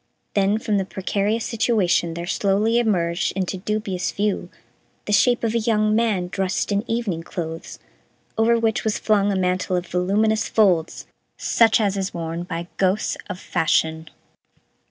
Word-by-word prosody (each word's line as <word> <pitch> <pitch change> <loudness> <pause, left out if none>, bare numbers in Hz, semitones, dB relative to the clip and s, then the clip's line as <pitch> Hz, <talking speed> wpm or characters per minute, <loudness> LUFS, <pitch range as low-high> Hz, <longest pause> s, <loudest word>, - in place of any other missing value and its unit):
Then 200 +1 +2
from 215 -2 0
the - - 0
precarious 205 +4 -1
situation 200 -7 +1
there 170 0 -4
slowly 205 +5 +1
emerged 175 -7 0
into 190 0 -2
dubious 200 -2 -2
view 205 0 -1 0.6
the 210 - -1
shape 240 +5 +3
of 225 -1 0
a 235 - +2
young 215 -1 +2
man 215 -6 +1
dressed 190 +2 -1
in 200 +1 +1
evening 225 -8 -1
clothes 165 -1 -6 0.6
over 230 +1 +3
which 225 -2 0
was 215 -1 0
flung 205 -2 +2
a - - 0
mantle 185 0 0
of 180 0 -1
voluminous 205 +5 +1
folds 185 -7 +2 0.3
such 225 -1 +3
as 200 -2 +1
is 195 -1 -3
worn 165 0 -4
by 170 -1 -5
ghosts 195 +2 +1
of 180 - -5
fashion. 160 -1 0
200 Hz, 155 wpm, -22 LUFS, 180-215 Hz, 0.6 s, shape